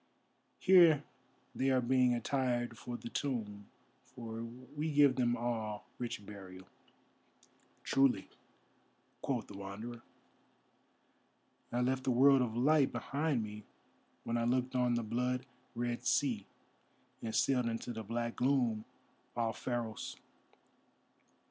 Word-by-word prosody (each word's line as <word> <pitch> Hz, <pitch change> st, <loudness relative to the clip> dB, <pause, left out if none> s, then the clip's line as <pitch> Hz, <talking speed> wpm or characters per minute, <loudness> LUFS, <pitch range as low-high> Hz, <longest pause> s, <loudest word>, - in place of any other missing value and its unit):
Here 170 Hz, -6 st, +6 dB, 0.5 s
they 135 Hz, -, +1 dB
are 130 Hz, -1 st, +4 dB
being 125 Hz, 0 st, +3 dB
attired 120 Hz, -1 st, -1 dB
for 120 Hz, +1 st, -6 dB
the 120 Hz, -, -8 dB
tomb, 105 Hz, -8 st, -3 dB, 0.4 s
for 115 Hz, -1 st, -7 dB
we 130 Hz, +6 st, -5 dB
give 145 Hz, -2 st, +5 dB
them 120 Hz, -1 st, +2 dB
all 115 Hz, -3 st, -3 dB
rich 120 Hz, -3 st, -4 dB
burial." 95 Hz, -2 st, -10 dB, 1.2 s
"Truly," 135 Hz, -7 st, +3 dB, 0.9 s
quoth 125 Hz, -4 st, -1 dB
the 100 Hz, -, -11 dB
Wanderer, 110 Hz, +5 st, -7 dB, 1.7 s
"I 120 Hz, -, 0 dB
left 130 Hz, +1 st, +1 dB
the 135 Hz, -, 0 dB
world 135 Hz, +2 st, +6 dB
of 115 Hz, -2 st, -1 dB
Light 140 Hz, +2 st, +4 dB
behind 140 Hz, +1 st, -1 dB
me 105 Hz, 0 st, -7 dB, 0.6 s
when 115 Hz, 0 st, -1 dB
I -, -, 0 dB
looked 125 Hz, +2 st, 0 dB
on 125 Hz, -1 st, +2 dB
the 120 Hz, -, 0 dB
blood 125 Hz, +3 st, -1 dB, 0.3 s
red 120 Hz, 0 st, -2 dB
sea 120 Hz, -9 st, +1 dB, 0.7 s
and 110 Hz, -1 st, -4 dB
sailed 125 Hz, -3 st, +2 dB
into 115 Hz, +1 st, -3 dB
the 110 Hz, -, -5 dB
black 115 Hz, +2 st, -3 dB
gloom 125 Hz, -5 st, +1 dB, 0.5 s
off 115 Hz, -1 st, -1 dB
Pharos. 120 Hz, -3 st, -3 dB
120 Hz, 120 wpm, -34 LUFS, 115-130 Hz, 1.7 s, Here